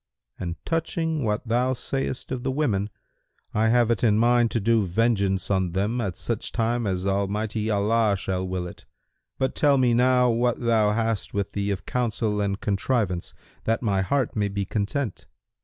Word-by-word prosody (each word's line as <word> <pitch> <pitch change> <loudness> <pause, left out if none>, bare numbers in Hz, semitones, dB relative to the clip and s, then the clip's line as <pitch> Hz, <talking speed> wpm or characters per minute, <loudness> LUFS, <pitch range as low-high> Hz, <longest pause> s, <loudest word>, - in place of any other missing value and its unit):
And 85 -2 -3
touching 165 -2 -1
what 105 +2 -1
thou 125 +3 +2
sayest 130 0 -4
of 130 -2 -2
the - - -2
women, 120 -8 0 0.6
I 110 +1 +2
have 120 0 +3
it 115 - 0
in 105 -3 +4
mind 120 +1 +4
to 115 - 0
do 115 +1 +3
vengeance 100 -1 +1
on 95 -3 +1
them 105 +6 0
at 95 -5 -3
such 100 +5 -3
time 115 0 0
as 95 -1 -1
Almighty 105 +3 -1
Allah 105 0 +2
shall 95 -1 -2
will 90 -1 -3
it. 90 - -10 0.5
But 130 - 0
tell 145 -2 +3
me 125 -2 +3
now 125 +1 +4
what 120 +1 +1
thou 110 -3 +2
hast 115 -3 -1
with 100 -1 -1
thee 100 0 -2
of 100 -1 -3
counsel 110 -4 -1
and 100 -1 -1
contrivance, 100 -3 -1 0.3
that 115 +2 0
my 100 -4 +1
heart 125 +6 0
may 105 -2 +1
be 100 0 -2
content." 105 +4 -2
110 Hz, 175 wpm, -25 LUFS, 100-120 Hz, 0.6 s, in